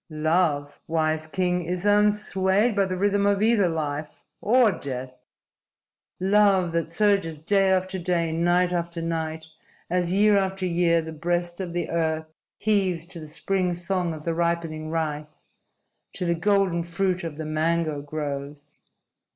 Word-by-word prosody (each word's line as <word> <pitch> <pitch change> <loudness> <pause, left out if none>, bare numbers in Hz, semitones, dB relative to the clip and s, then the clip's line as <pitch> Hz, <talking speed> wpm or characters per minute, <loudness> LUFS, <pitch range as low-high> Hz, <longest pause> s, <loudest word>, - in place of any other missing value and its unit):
"Love, 155 -2 0
wise 155 -1 0
king, 180 +1 0
is 180 +3 -3
unswayed 205 0 +2
by 200 -1 +3
the 185 -1 -3
rhythm 200 +1 +2
of 200 0 +2
either 215 -5 +4
life 150 -2 -4 0.2
or 235 0 +4
death. 130 -5 -6 1.1
Love 195 -2 +3
that 165 0 -2
surges 195 -5 +1
day 195 +4 +2
after 190 0 0
day, 170 -2 0
night 175 +2 +2
after 170 0 -2
night, 160 -1 -3 0.5
as 180 -1 +1
year 205 +1 +4
after 190 -1 -2
year 170 -1 +2
the 160 - -7
breast 175 +2 -2
of 185 -2 -4
the 175 -1 -2
earth 160 -1 0 0.3
heaves 190 -6 0
to 170 -1 -10
the 155 - -9
spring 180 +3 -1
song 175 0 -1
of 155 -1 -8
the 165 - 0
ripening 165 -2 -2
rice, 155 -2 -4 0.7
to 180 - -3
the 170 - +2
golden 190 0 +1
fruit 180 +2 -1
of 160 -3 -5
the 160 - -5
mango 155 -1 0
groves. 145 -1 -6
170 Hz, 150 wpm, -25 LUFS, 160-190 Hz, 1.1 s, either